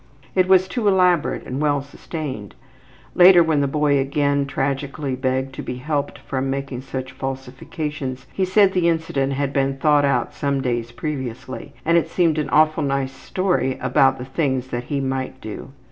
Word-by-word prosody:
It 185 -1 +3
was 185 0 +5
too 215 +2 -1
elaborate 180 -4 +2
and 130 +3 -4
well 145 -2 +2
sustained. 140 - -7 0.6
Later, 180 -1 +8
when 160 -3 +1
the 140 - +1
boy 145 0 +2
again 140 +1 +1
tragically 140 0 -2
begged 130 +1 -1
to - - -6
be 125 - -5
helped 145 +3 -2
from 135 0 -3
making 135 -2 -3
such 130 -1 -6
falsifications, 135 +1 -5
he 190 - 0
said 190 +1 +4
the 175 -2 +3
incident 145 -5 0
had 140 0 -2
been 135 -1 0
thought 145 +1 +3
out 140 -4 +1
some 140 -2 -1
days 120 -3 -2
previously 130 0 -6
and 170 +1 +5
it - - -4
seemed 165 -4 +2
an 150 - -2
awful 155 +1 +3
nice 135 -2 -1
story 175 -5 -1
about 135 +1 +3
the 125 - -6
things 130 -2 -1
that 120 0 -4
he 145 - -2
might 130 -1 -3
do. 110 +4 -8
140 Hz, 175 wpm, -21 LUFS, 130-155 Hz, 0.6 s, Later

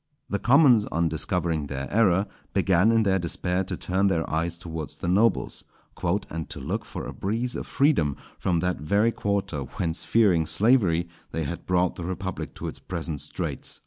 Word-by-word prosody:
The 100 - 0
commons, 125 -5 +5
on 85 -3 0
discovering 80 -1 -1
their 70 0 -4
error, 100 -3 +4 0.3
began 95 +1 +4
in 115 -1 +4
their 95 -2 +2
despair 90 +2 -1
to - - -4
turn 95 +2 +1
their 85 -4 0
eyes 85 +2 -1
towards 80 -3 -6
the - - -5
nobles, 105 +6 +2 0.3
"_and 85 -3 -2
to - - -6
look 95 +11 -3
for - - -6
a - - -6
breeze 115 +6 -2
of - - -5
freedom 135 - +2 0.2
from 85 -3 +1
that 90 +1 0
very 100 +9 +2
quarter 100 -8 -2
whence 80 +5 -2
fearing 95 -8 +3
slavery 95 -7 +3 0.3
they 80 - -1
had 85 +4 -5
brought 90 0 +1
the 90 - -5
republic 95 +1 -4
to - - -5
its - - -7
present 80 -5 -4
straits. 75 - -5
90 Hz, 175 wpm, -26 LUFS, 80-100 Hz, 0.3 s, commons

